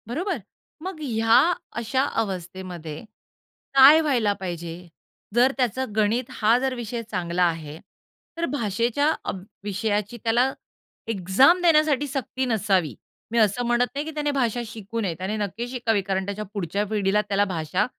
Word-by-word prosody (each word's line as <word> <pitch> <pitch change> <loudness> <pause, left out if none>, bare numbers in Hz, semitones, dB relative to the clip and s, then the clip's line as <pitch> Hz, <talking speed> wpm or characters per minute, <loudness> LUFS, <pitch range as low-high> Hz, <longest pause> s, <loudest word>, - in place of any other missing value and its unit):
बरोबर. 330 - -2 0.4
मग 370 -3 -5
ह्या 225 -4 +4 0.4
अशा 245 +3 0 0.2
अवस्थेमध्ये 180 -4 -6 0.7
काय 275 +4 +9
व्हायला 250 -9 +2
पाहिजे? 175 -1 -6 0.5
जर 250 +2 +5
त्याचा 260 0 0
गणित 220 +3 +1
हा 225 +2 +3
जर 265 0 -1
विषय 235 -1 -4
चांगला 175 0 0
आहे, 160 -3 -1 0.6
तर 335 - 0
भाषेच्या 235 +4 +1
अभ 185 - -4 0.2
विषयाची 205 +2 -2
त्याला 240 +3 +3 0.6
एक्झाम 225 - +4
देण्यासाठी 305 -4 +3
सक्ती 265 -1 -3
नसावी. 195 - +1 0.4
मी 235 - -1
असं 220 +3 +2
म्हणत 240 +1 +3
नाही 290 +2 -2
की 315 - -5
त्याने 295 -1 0
भाषा 245 -4 0
शिकू 220 0 -6
नये. 190 -5 -1
त्याने 190 +4 -3
नक्की 210 +3 -3
शिकावी. 235 -4 0
कारण 190 0 -2
त्याच्या 200 +2 -4
पुढच्या 200 +1 -2
पिढीला 210 -1 +1
त्याला 205 0 +2
भाषा 180 +1 -1
220 Hz, 145 wpm, -24 LUFS, 190-255 Hz, 0.7 s, काय